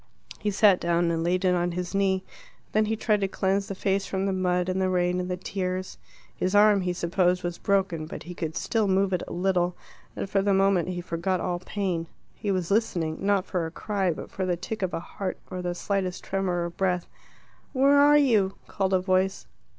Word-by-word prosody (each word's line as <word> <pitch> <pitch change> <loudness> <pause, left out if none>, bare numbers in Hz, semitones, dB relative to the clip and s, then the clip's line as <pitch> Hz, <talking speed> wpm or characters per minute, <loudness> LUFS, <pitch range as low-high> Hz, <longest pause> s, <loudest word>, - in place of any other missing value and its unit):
He 210 - -1
sat 200 -2 +5
down 170 0 +1
and 165 0 -1
laid 180 +2 +1
it 180 - +4
on 175 0 0
his 180 +1 -4
knee. 190 -1 +1 0.5
Then 215 0 +3
he 220 +1 0
tried 210 -1 +1
to 195 - +2
cleanse 195 +1 0
the 195 - -5
face 195 0 0
from 190 0 -1
the 195 - 0
mud 180 -1 +1
and 185 +1 0
the 185 - +2
rain 180 0 +1
and 180 0 -3
the 180 - -2
tears. 185 0 -4 0.4
His 185 +2 -1
arm, 205 -1 +6
he 180 -1 -1
supposed, 180 +1 +1
was 175 -1 -3
broken, 190 -6 0
but - - -7
he 180 - -8
could 160 -2 -4
still 220 -3 0
move 190 0 +2
it 180 - +1
a - - -8
little, 180 -1 +1 0.4
and - - -3
for 195 0 +1
the 200 0 +2
moment 195 -3 +3
he 180 -1 -3
forgot 175 +2 -1
all 175 0 -2
pain. 180 -3 -2 0.3
He 205 - -5
was 185 -2 -1
listening 170 -7 0
not 200 -1 +2
for 175 -4 -2
a - - -6
cry, 195 +1 -1
but 155 - -7
for 190 - -3
the 180 -2 0
tick 215 +5 -5
of 185 -2 -1
a - - -2
heart 185 +2 -5
or 185 -1 -4
the 175 -1 -2
slightest 185 -1 -2
tremor 185 -3 -1
of 170 0 -7
breath. 180 -2 0 0.7
"Where 280 +1 +4
are 290 +1 +7
you?" 215 -9 +3
called 195 -1 -1
a - - +3
voice. 185 +1 0
185 Hz, 220 wpm, -26 LUFS, 180-195 Hz, 0.7 s, are